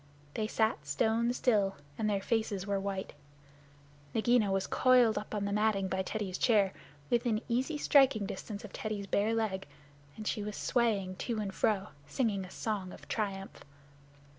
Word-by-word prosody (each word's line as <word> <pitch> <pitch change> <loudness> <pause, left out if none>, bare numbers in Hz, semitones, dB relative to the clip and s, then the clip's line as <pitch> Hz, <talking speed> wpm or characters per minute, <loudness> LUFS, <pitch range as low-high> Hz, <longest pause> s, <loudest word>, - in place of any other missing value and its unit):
They 215 - -1
sat 220 0 0
stone 230 +1 +2
still, 210 -6 +2 0.2
and 215 -1 0
their 200 -2 0
faces 215 -4 0
were 200 -1 0
white. 195 -1 -4 1.0
Nagaina 225 -2 +3
was 195 0 +1
coiled 250 -4 +4
up 215 - -4
on 205 -1 -1
the 200 - -1
matting 210 -2 +2
by 190 0 -1
Teddy's 190 -1 -3
chair, 205 -5 +3 0.4
within 235 -2 +2
easy 260 +6 0
striking 270 -8 +4
distance 205 +2 -6
of 205 - -11
Teddy's 215 -2 -3
bare 210 +3 +1
leg, 200 -6 -1 0.5
and 215 - -7
she 210 - -1
was 210 0 -5
swaying 205 -7 +1
to 235 -3 -2
and 200 -2 -3
fro, 195 -4 +1 0.2
singing 200 - 0
a - - -11
song 200 -3 -3
of - - -12
triumph. 195 -3 -3
210 Hz, 165 wpm, -32 LUFS, 195-225 Hz, 1.0 s, coiled